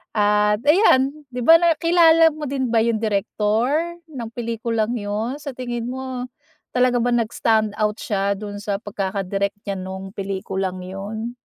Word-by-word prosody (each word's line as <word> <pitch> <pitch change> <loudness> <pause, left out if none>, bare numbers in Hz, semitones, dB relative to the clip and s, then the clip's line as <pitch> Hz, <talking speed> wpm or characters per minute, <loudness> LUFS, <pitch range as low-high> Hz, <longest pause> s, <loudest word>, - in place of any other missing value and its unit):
at 210 0 +3
ayan! 290 -4 +5 0.2
di 250 - -5
ba. 325 +7 +8
Nakilala 330 -1 +5
mo 310 - -7
din 265 -1 -1
ba 230 - +4
yung 230 -1 +1
direktor 215 +2 0 0.4
ng 240 -6 -6
pelikulang 230 -1 -2
'yon? 220 +5 -3
Sa 280 -3 -7
tingin 240 -2 -4
mo, 255 0 -5 0.5
talaga 250 -1 +3
ba 245 +1 +1
nag-stand 220 -2 +1
out 210 -1 +1
siya 200 -1 -1
do'n 205 0 -7
sa 205 0 -2
pagkakadirek 200 -1 -2
niya 200 -1 -3
nung 190 +1 -7
pelikulang 190 -1 -4
'yon? 205 +5 -6
220 Hz, 145 wpm, -22 LUFS, 205-250 Hz, 0.5 s, ba